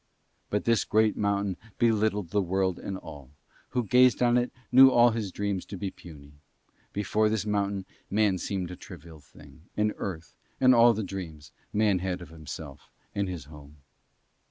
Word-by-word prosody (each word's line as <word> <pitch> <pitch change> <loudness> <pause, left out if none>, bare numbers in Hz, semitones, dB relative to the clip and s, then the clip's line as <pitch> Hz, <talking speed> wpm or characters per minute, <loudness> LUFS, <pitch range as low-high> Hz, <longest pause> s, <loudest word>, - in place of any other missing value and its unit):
But 105 - -1
this 115 -2 +3
great 110 0 +2
mountain 100 -2 -1 0.2
belittled 105 -5 +1
the 105 - +2
world 95 0 0
and 95 - -5
all: 70 -7 -11 0.4
who 125 - -1
gazed 125 +3 +4
on 120 0 +4
it 125 0 +1 0.2
knew 130 +1 +9
all 120 -1 +5
his 110 -4 -3
dreams 100 -1 -2
to 100 - -8
be 95 0 -4
puny. 75 -4 -14 0.6
Before 105 +2 +1
this 110 -2 -1
mountain 100 -2 -1 0.2
Man 100 -2 +2
seemed 90 0 -3
a - - -6
trivial 80 -2 -12
thing, 75 - -17 0.2
and 105 0 +1
Earth, 85 -4 -6 0.3
and 130 -1 +6
all 120 0 +6
the 110 - -2
dreams 80 -6 -7 0.2
Man 105 -3 +2
had 90 0 -3
of 85 -4 -11
himself 80 -2 -9 0.2
and 100 -2 -1
his 85 -6 -6
home. 75 0 -14
100 Hz, 170 wpm, -28 LUFS, 90-110 Hz, 0.6 s, knew